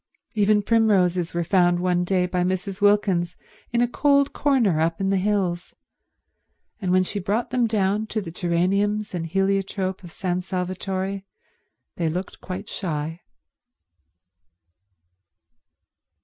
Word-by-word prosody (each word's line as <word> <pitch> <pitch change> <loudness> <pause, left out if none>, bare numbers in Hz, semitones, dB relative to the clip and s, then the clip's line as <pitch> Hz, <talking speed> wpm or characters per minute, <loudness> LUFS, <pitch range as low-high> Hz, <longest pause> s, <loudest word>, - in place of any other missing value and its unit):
Even 210 -1 +3
primroses 185 -7 +2
were 170 - +1
found 175 0 +3
one 180 0 +1
day 180 0 +1
by 180 0 -1
Mrs. 185 +2 -2
Wilkins 200 -4 +2 0.4
in 240 0 +2
a 245 - +3
cold 280 +2 +2
corner 240 - +2
up 165 +1 0
in 195 0 0
the 195 - +2
hills; 185 -3 -1 1.1
and 185 -2 -1
when 185 0 +4
she 205 +2 -3
brought 210 +6 -1
them 245 -2 +2
down 210 0 0
to 220 - -2
the 170 -6 -6
geraniums 195 +5 0
and 165 -2 -3
heliotrope 195 +1 -1
of 175 - -10
San 180 +1 -2
Salvatore 185 +1 -3 0.8
they 165 -2 0
looked 180 +4 -5
quite 190 +3 -6
shy. 165 -4 -3
190 Hz, 130 wpm, -24 LUFS, 180-205 Hz, 1.1 s, when